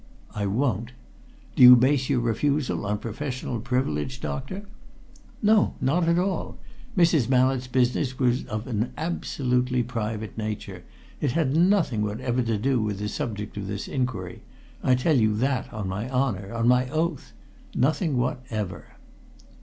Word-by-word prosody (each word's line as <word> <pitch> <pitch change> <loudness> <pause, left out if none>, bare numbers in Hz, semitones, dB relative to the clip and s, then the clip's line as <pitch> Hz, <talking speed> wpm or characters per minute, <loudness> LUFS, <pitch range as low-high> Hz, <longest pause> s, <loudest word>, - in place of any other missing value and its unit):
"I 100 -1 -2
won't!" 115 +1 -1 0.6
"Do - - +1
you 125 0 +12
base 130 +2 +2
your 130 -4 +2
refusal 130 0 0
on 105 0 0
professional 125 +2 -4
privilege, 125 - -1
doctor?" 185 +12 -5 0.8
"No! 215 -1 +4
Not 165 +6 +1
at 170 - +3
all. 185 +1 -1 0.4
Mrs. 165 -8 +4
Mallett's 130 0 +2
business 125 +1 +1
was 125 0 +1
of 110 +1 -4
an 115 -1 -2
absolutely 125 -6 0
private 110 -2 -4
nature. 110 -1 -5 0.4
It 140 -5 0
had 155 -4 +1
nothing 170 - +3
whatever 120 +4 -1
to 115 -2 0
do 125 +2 +1
with 105 -2 -2
the 105 +1 -3
subject 105 -1 -4
of 100 -2 -4
this 100 0 -4
inquiry 110 -9 -3 0.4
I 130 - +3
tell 140 +4 +2
you 110 -1 +2
that 130 +2 -1
on 105 -3 -4
my 105 +6 -3
honour, 120 -7 -1
on 115 0 0
my 125 +1 +3
oath. 160 +1 -2 0.4
Nothing 150 +2 +1
whatever!" 120 -5 -3
125 Hz, 145 wpm, -25 LUFS, 110-135 Hz, 0.8 s, you